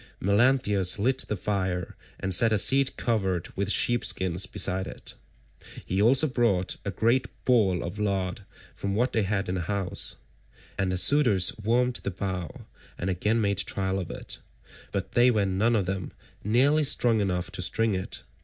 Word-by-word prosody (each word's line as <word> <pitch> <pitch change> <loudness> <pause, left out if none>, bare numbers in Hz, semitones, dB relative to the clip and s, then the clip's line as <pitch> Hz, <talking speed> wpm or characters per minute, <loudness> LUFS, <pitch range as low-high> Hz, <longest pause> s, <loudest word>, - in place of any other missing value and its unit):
Melanthius 100 -3 +2
lit 125 +6 0
the 105 - -3
fire, 95 -3 -3 0.2
and 95 0 0
set 115 +5 +5
a 110 - +3
seat 135 +6 +3
covered 95 -7 -1
with 100 0 -2
sheep 120 +2 +2
skins 95 0 0
beside 95 0 -1
it. - - -7 0.7
He 95 +2 -1
also 130 +7 +5
brought 115 -9 0
a - - -3
great 115 +7 +1 0.2
ball 105 -8 +2
of 90 +5 -6
lard 95 -3 -2 0.3
from 100 0 -4
what 120 +4 0
they 110 - +2
had 100 0 -1
in 90 - -2
the 90 - -2
house, 100 +1 -1 0.6
and 95 -1 -1
the 90 - -1
suitors 105 -6 +4
warmed 120 +3 +1
the - - -4
bow 90 -2 -5 0.3
and 95 +2 -2
again 105 +6 0
made 100 -2 0
trial 95 0 -1
of 90 - -6
it, - - -6 0.5
but - - -4
they 120 +1 +4
were 105 -4 +1
none 100 +5 +1
of 100 -4 +1
them 95 -2 -4 0.3
nearly 135 +8 +3
strong 120 -5 +2
enough 90 -3 -2
to - - -5
string 115 +4 +1
it. 95 0 -4
100 Hz, 175 wpm, -26 LUFS, 95-115 Hz, 0.7 s, set